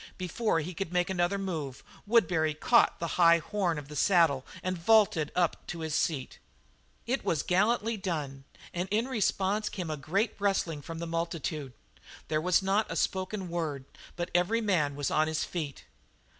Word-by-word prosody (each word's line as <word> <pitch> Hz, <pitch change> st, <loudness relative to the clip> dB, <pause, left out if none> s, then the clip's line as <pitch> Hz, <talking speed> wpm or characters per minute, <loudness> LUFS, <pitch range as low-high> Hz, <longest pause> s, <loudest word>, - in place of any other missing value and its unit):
Before 185 Hz, 0 st, 0 dB
he 175 Hz, +4 st, -5 dB
could 185 Hz, 0 st, -4 dB
make 180 Hz, +1 st, +1 dB
another 180 Hz, +1 st, +1 dB
move, 160 Hz, -9 st, -4 dB, 0.2 s
Woodbury 165 Hz, -9 st, +3 dB
caught -, -, +4 dB
the 170 Hz, -, -2 dB, 0.2 s
high 170 Hz, 0 st, +7 dB
horn 180 Hz, -1 st, -1 dB
of 145 Hz, -2 st, -7 dB
the 150 Hz, -, -9 dB
saddle 160 Hz, -6 st, +3 dB, 0.2 s
and 185 Hz, 0 st, -1 dB
vaulted 180 Hz, -4 st, +3 dB
up 175 Hz, -2 st, +2 dB
to 170 Hz, -2 st, -5 dB
his 160 Hz, -1 st, -3 dB
seat. 150 Hz, -4 st, -1 dB, 0.7 s
It 260 Hz, +3 st, -1 dB
was 155 Hz, -4 st, 0 dB
gallantly 220 Hz, +4 st, +1 dB
done 150 Hz, -8 st, -4 dB, 0.3 s
and 180 Hz, +2 st, -2 dB
in 220 Hz, +4 st, +1 dB
response 210 Hz, -3 st, 0 dB
came 175 Hz, -5 st, -4 dB
a 155 Hz, -, -3 dB
great 195 Hz, -, 0 dB
rustling 190 Hz, -6 st, 0 dB
from 165 Hz, +3 st, -7 dB
the 170 Hz, -, -4 dB
multitude; 165 Hz, -4 st, -3 dB, 0.6 s
there 155 Hz, 0 st, +1 dB
was 180 Hz, +2 st, +3 dB
not 200 Hz, +3 st, +1 dB
a -, -, -3 dB
spoken 190 Hz, +3 st, -1 dB
word, 160 Hz, -6 st, -3 dB, 0.3 s
but 175 Hz, +1 st, -4 dB
every 180 Hz, +6 st, +2 dB
man 170 Hz, -10 st, +1 dB
was 145 Hz, -1 st, -2 dB
on 155 Hz, 0 st, +3 dB
his 160 Hz, -1 st, -1 dB
feet. 155 Hz, -6 st, -5 dB
175 Hz, 170 wpm, -29 LUFS, 155-195 Hz, 0.7 s, high